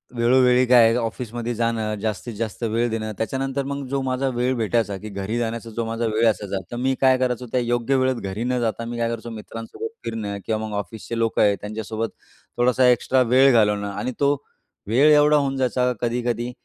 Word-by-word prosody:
वेळोवेळी 125 +1 +4
काय 125 -1 +6
आहे 115 +1 +3
ऑफिसमध्ये 120 0 -3
जाणं 115 -2 -1
जास्तीत 110 +2 -3
जास्त 110 +1 -4
वेळ 115 +1 0
देणं, 110 -1 -3
त्याच्यानंतर 135 +4 -2
मग 140 0 -4
जो 140 0 -1
माझा 130 +1 -1
वेळ 125 +2 +1
भेटायचा, 110 -2 0
की 110 +3 -8
घरी 100 +3 -3
जाण्याचा 115 0 -3
जो 115 - 0
माझा 115 +1 -2
वेळ 110 +1 +2
असायचा, 100 -3 -1
तर - - -4
मी 130 +2 +1
काय 130 -1 +5
करायचो, 125 -1 -1
त्या 125 - +1
योग्य 120 +2 0
वेळेत 130 0 +2 0.2
घरी 105 +4 -4
न 125 0 0
जाता 115 0 -2
मी 120 +1 -5
काय 115 0 0
करायचो 115 0 -5
मित्रांसोबत 115 - -7 0.2
फिरणं 105 -3 -4
किंवा 110 -1 -1
मग 105 - -7
ऑफिसचे 110 +3 -5
लोकं 115 -1 +1
आहेत, 100 -1 +3
त्यांच्यासोबत 110 +1 -4 0.5
थोडासा 125 +1 +3
एक्स्ट्रा 125 +2 +3
वेळ 135 +1 +7
घालवणं 105 -3 +3
आणि 100 +5 -3
तो 140 0 +3 0.5
वेळ 135 +8 +5
एवढा 150 +1 +5
होऊन 135 -2 0
जायचा 125 -1 +1
कधी-कधी, 120 0 -1
120 Hz, 195 wpm, -23 LUFS, 110-130 Hz, 0.5 s, वेळ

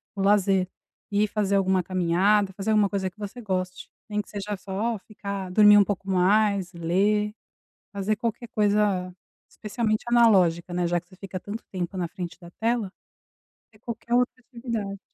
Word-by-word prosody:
o 195 - -3
lazer, 195 -2 +3 0.4
e 205 +1 +2
fazer 205 -1 0
alguma 190 -1 +2
caminhada, 190 +3 +2
fazer 195 +3 -4
alguma 210 -2 +4
coisa 190 -2 -1
que 185 - -32
você 210 +4 -7
goste, 185 -3 -3 0.2
nem 210 -1 -1
que - - -18
seja 205 0 -4
só 205 +4 -3
ficar 200 -2 -6
dormir 210 +1 +7
um - - +7
pouco 195 -1 -4
mais, 195 0 +2
ler, 200 +5 +1 0.6
fazer 200 +2 0
qualquer 235 +2 -3
coisa, 205 -4 +1 0.4
especialmente 215 0 -2
analógica, 185 -8 +4
né, 175 0 0
já 175 0 +1
que 175 - -24
você 185 - -17
fica 190 -1 -7
tanto 210 +5 -7
tempo 185 0 -4
na 175 -2 -1
frente 175 0 -7
da 170 - -11
tela, 225 -3 0 0.8
é 215 - -22
qualquer 235 +1 -4
outra 250 +1 +2
atividade. 230 -5 -5
200 Hz, 165 wpm, -25 LUFS, 185-215 Hz, 0.8 s, dormir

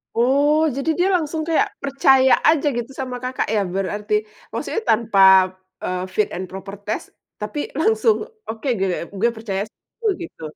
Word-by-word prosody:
Oh, 290 +6 +3
jadi, 275 +3 -2
dia 360 - +3
langsung 320 -2 -1
kayak 320 - +3
percaya 270 -1 +4 0.2
aja 310 -2 +2
gitu 240 +2 -4
sama 255 -1 -4
Kakak, 255 +1 -2
ya, 210 - +2
berarti, 205 +2 -2 0.4
maksudnya 450 - -2
tanpa, 220 -2 +2 0.6
eee, 180 0 -2
fit 215 - +2
and 185 - -4
proper 195 +1 -7
test 215 - -3 0.4
tapi 210 +8 -4 0.2
langsung, 445 +4 +3 0.3
oke, 225 +4 -5
gitu 190 -1 +1
ya, - - -4 0.2
"Gue 235 +4 +3
percaya 200 -3 -3
sama - - -39
lu." - - +4 0.2
Gitu. 335 - -11
250 Hz, 165 wpm, -21 LUFS, 210-295 Hz, 0.6 s, percaya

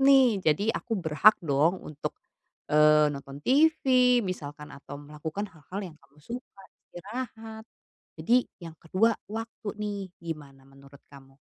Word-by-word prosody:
nih 265 -6 +5
jadi 185 +7 +2
aku 225 - -2
berhak 175 +4 +5
dong 155 +5 +1
untuk, 150 -1 -6 0.6
eee, 150 0 +5
nonton 140 0 -8
TV, 305 +5 +5 0.5
misalkan, 150 -5 -6
atau 140 0 -9
melakukan 150 +6 -6
hal-hal 170 +5 -7
yang - - -20
kamu 140 +1 -26
suka, 235 -5 -8 0.3
istirahat." 220 +2 -7 0.6
Jadi, 240 +10 +3 0.2
yang 165 -3 -9
kedua 200 +8 +1 0.2
waktu 225 0 -5
nih, 200 -3 -4
gimana 145 -5 -8
menurut 140 0 -17
kamu? 135 -1 -16
165 Hz, 130 wpm, -28 LUFS, 145-220 Hz, 0.6 s, nih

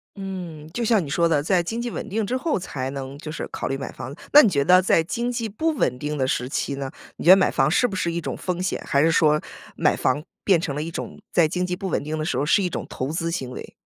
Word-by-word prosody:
嗯， 180 -6 -7
就 235 +5 -2
像 215 -5 +3
你 140 - -7
说 170 +4 +2
的， 155 -3 +2
在 175 +3 +2
经 225 +7 -3
济 240 - -3
稳 220 - -5
定 215 +1 -1
之 250 +6 -1
后 290 - -1
才 135 -7 -4
能， 135 0 -6
就 155 +1 -7
是 - - -5
考 - - -4
虑 135 - -1
买 135 0 -5
房。 130 +5 -8 0.2
那 295 - +9
你 215 - +5
觉 140 -5 +1
得 180 +4 +6
在 180 -2 +3
经 235 +7 -2
济 230 -2 -3
不 315 +11 0
稳 125 - 0
定 150 +3 -3
的 130 -2 0
时 125 -1 -1
期 140 +1 -2
呢， 135 -1 -5 0.3
你 - - -7
觉 175 - +9
得 - - +11
买 190 - +3
房 - - +2
是 245 +9 +3
不 195 - -5
是 170 -2 0
一 170 0 -2
种 - - -4
风 180 -1 -3
险， 185 - -1
还 140 - +2
是 165 +2 +4
说 150 -2 +3 0.3
买 - - +2
房 135 +3 0 0.2
变 185 -5 +4
成 155 -6 -3
了 150 - -2
一 165 - -5
种， - - -6
在 170 -2 +4
经 180 +3 -1
济 180 - -2
不 190 +1 -5
稳 - - -1
定 155 +2 -3
的 155 - -2
时 - - -1
候 145 - +1
是 165 - +4
一 180 - 0
种 - - -4
投 130 - -4
资 165 +1 -2
行 135 -7 -3
为？ 125 - -9
170 Hz, 315 characters per minute, -23 LUFS, 145-195 Hz, 0.3 s, 得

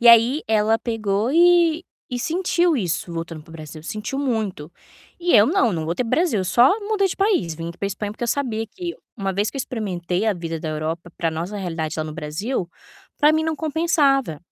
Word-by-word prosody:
E 240 - +3
aí 235 +6 +7
ela 220 +1 +3
pegou 220 0 -1
e 345 0 +5 0.3
e - - -1
sentiu 345 +2 +1
isso 175 -4 -2
voltando 165 -2 -5
pro 165 - -18
Brasil, 155 -1 -9
sentiu 215 +10 -4
muito. 215 - -2 0.5
E 350 0 +1
eu 210 -1 +8
não, 285 - +2
não 160 -2 -2
voltei 175 +10 -1
pro 230 - -5
Brasil, 320 - +2
eu - - -2
só 250 - +5
mudei 405 -2 +1
de - - -4
país, 390 - +1
vim 165 +1 -5
aqui 170 - -14
pra 200 - -1
Espanha, 205 +1 -4
porque 220 - -10
eu 235 - 0
sabia 225 -6 -1
que 345 - -6 0.2
uma 195 -3 -2
vez 205 +3 0
que - - -9
eu - - -2
experimentei 190 -5 -2
a 215 - +2
vida 165 -2 -5
da 160 - -4
Europa, 160 +3 -3
pra 165 -2 0
nossa 170 +6 -4
realidade 165 -4 -3
lá 155 - -1
no 155 - -6
Brasil, 175 - -3 0.5
pra 300 0 +5
mim 315 0 +2
não 320 -1 -1
compensava, 295 - +1
215 Hz, 215 wpm, -22 LUFS, -, 0.5 s, eu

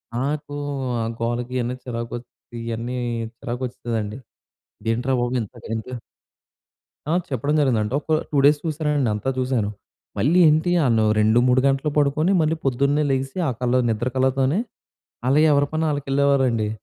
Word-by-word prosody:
నాకు 145 +3 -2 0.5
ఆ! - - 0 0.2
గోలకి 120 +2 -2
ఇవన్నీ 125 +1 -1
చిరాకు, 115 -1 -5 0.5
ఇవన్నీ 115 +2 -4 0.4
చిరాకు 125 -1 -5
వస్తుందండి. 115 -3 -4 0.8
ఏంట్రా 125 +3 -1
బాబు! 120 +1 -1
ఇంత 100 - -12
గ‌నింకా 115 +3 -4 1.2
ఆ! - - +2 0.2
చెప్పడం 140 +4 -1
జరిగిందంటే, 120 -5 +1
ఒక 155 0 +1
2 145 - 0
డేస్ 145 +1 +5
చూశానండి. 150 -5 0
అంతా 105 +5 -2
చూశాను. 125 -5 0 0.5
మళ్ళీ 165 +8 +3
ఏంటి 160 +3 +2
ఆ‌ళ్లు 115 -3 +3
2,3 120 +4 +4
గంటలు 135 +2 +1
పడుకొని, 150 +5 +2
మళ్ళీ 155 +1 +1
పొద్దున్నే 140 +3 +2
లేగిసి 135 +5 -2
ఆ - - +2
కళ్ల 125 +1 +2
నిద్ర 115 +2 -1
కళ్ళతోనే, 130 +6 +2 0.7
అలా 135 +4 +4
ఎవరి 145 0 +3
పని 160 +1 0
వాళ్ళకి 145 -2 -2
వెళ్ళేవారండి. 135 -6 +2
130 Hz, 140 wpm, -22 LUFS, 120-145 Hz, 1.2 s, డేస్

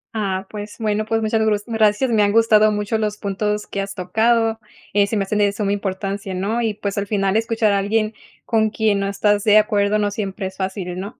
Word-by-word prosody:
Ah, 195 -3 -2
pues, 210 0 -7
bueno, 215 -1 -1
pues 225 0 -1
muchas 220 0 +1
gro 220 -1 +3
gracias. 225 +2 +2
Me 220 -2 +3
han 205 0 +3
gustado 215 -1 +5
mucho 210 +1 -1
los 210 -1 -2
puntos 210 +1 -2
que 200 - -4
has 195 0 -6
tocado. 225 +5 +1 0.3
Eh, 200 0 +3
se 215 - -2
me 200 - +1
hacen 210 +2 -2
de 205 -1 +3
suma 200 -1 -2
importancia, 195 -1 -4
¿no? 205 +6 -1
Y, 220 -3 -1
pues, 200 -1 -3
al 200 - -3
final 195 -1 0
escuchar 225 -1 +1
a 200 - +2
alguien 215 +2 0 0.3
con 220 -2 +2
quien 215 -2 +1
no 200 - -1
estás 205 +1 +1
de 215 -1 +5
acuerdo 210 -1 +2
no 205 -1 0
siempre 200 -1 -4
es 190 0 -6
fácil, 190 -2 -4
¿no? 200 +5 -8
210 Hz, 225 wpm, -20 LUFS, 200-220 Hz, 0.3 s, gustado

